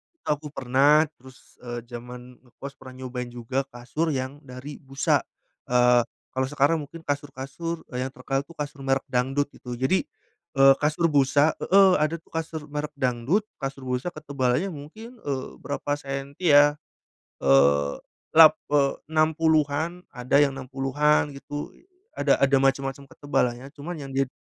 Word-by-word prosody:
itu - - -50
aku 150 0 -1
pernah. 140 +4 +4
Terus, 130 0 -18
eee, 120 -1 -5
zaman 125 +1 -10
ngekos 135 +3 -10
pernah 130 -1 -11
nyobain 125 -1 -5
juga 125 +3 -2
kasur 125 +7 -2
yang 130 +1 -3
dari 135 +2 -9
busa, 135 -1 +1 0.5
eee, 125 -1 +5 0.3
kalau 130 0 -1
sekarang 145 +3 +2
mungkin 165 +3 -11
kasur-kasur 145 +3 -4
yang 125 +1 -1
terkenal 135 +1 -2
itu 170 +2 -16
kasur 145 -1 -6
merk 135 0 +1
dangdut 135 +3 +1
gitu, 125 -1 -7
jadi, 130 +10 +1 0.5
eee, 135 0 +8
kasur 155 +3 +2
busa 145 +2 +4
heeh, 195 0 +5
ada 155 +2 +1
tuh - - -29
kasur 160 -1 -4
merk 150 +1 -3
dangdut, 130 - 0 0.2
kasur 135 -1 -5
busa 125 +4 -2
ketebalannya 140 +3 -1
mungkin, 220 - -11
eee, 135 -6 -4
berapa 145 0 -4
senti 140 +4 -1
ya, 145 0 +6 0.7
eee 70 +1 +4 0.4
lap 160 -1 +10 0.2
eee, 140 -2 +4 0.2
60-an, 160 +1 +1
ada 125 +2 -1
yang 145 - +4
60-an 135 +3 +1
gitu, 145 +1 -6 0.5
ada - - +3
ada 140 0 +5
macem-macem 135 0 0
ketebalannya, 125 -2 -1
cuma 165 +5 -5
yang 140 -2 -7
di 135 0 +1
140 Hz, 145 wpm, -25 LUFS, 130-150 Hz, 0.7 s, lap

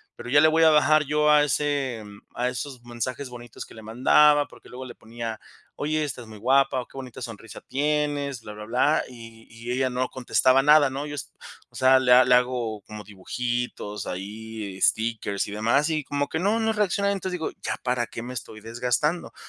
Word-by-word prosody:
pero 120 - -9
ya 145 +3 +5
le 155 - +6
voy 160 +1 +2
a 160 - +7
bajar 155 0 +4
yo 150 +1 +2
a 150 -1 +6
ese 140 -4 -1
mm, 100 0 -13 0.2
a 125 +1 0
esos 125 0 -6
mensajes 120 +3 -5
bonitos 120 -2 -9
que - - -16
le 110 - -11
mandaba, 145 +6 +4
porque - - -17
luego 130 +1 -8
le 120 - -9
ponía: 115 -1 -7 0.4
"Oye, 155 +1 -1
estás 130 -5 -6
muy 110 -1 -11
guapa 130 +3 +2
o - - -10
qué - - -15
bonita 130 -3 -8
sonrisa 115 -1 -9
tienes", 145 -2 -1
bla, 105 - -9
bla, 105 0 -9
bla, 125 +7 +2
y 115 -2 -13
y 115 +2 -7
ella 130 +1 +1
no 125 +1 -2
contestaba 130 +1 +2
nada, 150 0 +6
¿no?, 140 +2 -4
yo, 145 - -6
o - - -9
s - - -5 0.4
o - - -23
sea, 130 0 +5
le 125 -1 +4
le 125 0 +5
hago 125 -4 0
como 105 -1 -9
dibujitos 115 +1 -4
ahí, 105 +1 -6
stickers 110 -3 0
y - - -7
demás, 115 +9 +1
y 155 -2 -1
como 145 +1 -2
que 160 - -3
no, 205 +5 +1
no 220 0 +1
reacciona. 200 -1 +1
Entonces, 190 -2 -3
digo: 160 - -2
"¿Ya - - -2
para 125 -1 0
qué 115 - -8
me 125 +2 -7
estoy 110 -2 -8
desgastando?". 125 +9 -1
O - - -34
125 Hz, 215 wpm, -25 LUFS, 115-145 Hz, 0.4 s, a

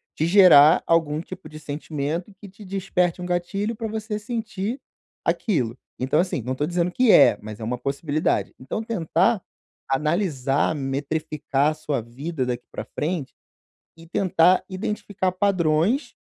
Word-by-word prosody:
te 155 - 0
gerar 170 -5 +7
algum 160 -3 +2
tipo 170 -1 -10
de 155 0 -10
sentimento 150 +4 -4
que 205 - -9
te 205 +3 -14
desperte 185 -2 -1
um - - -4
gatilho 195 +5 -2
pra 225 +1 -4
você 215 0 -3
sentir 220 +1 -4 0.5
aquilo. 130 - 0 0.2
Então, 130 +4 +1
assim, 180 -7 -2
não 130 +3 -3
tô 145 - -1
dizendo 175 +1 0
que 250 +4 +4
é, 105 - +7
mas 105 0 -8
é - - -7
uma 125 +2 -2
possibilidade. 145 +4 -1
Então 130 +12 -4
tentar 195 -1 +1 0.5
analisar, 145 -1 +1
metrificar 145 +1 -1
sua 150 -4 -2
vida 130 +5 -4
daqui 125 -1 -3
pra - - -6
frente, 155 -3 -3 0.6
e 165 - -14
tentar 180 0 +3
identificar 195 0 -2
padrões, 185 - +1
165 Hz, 145 wpm, -23 LUFS, 145-195 Hz, 0.6 s, gerar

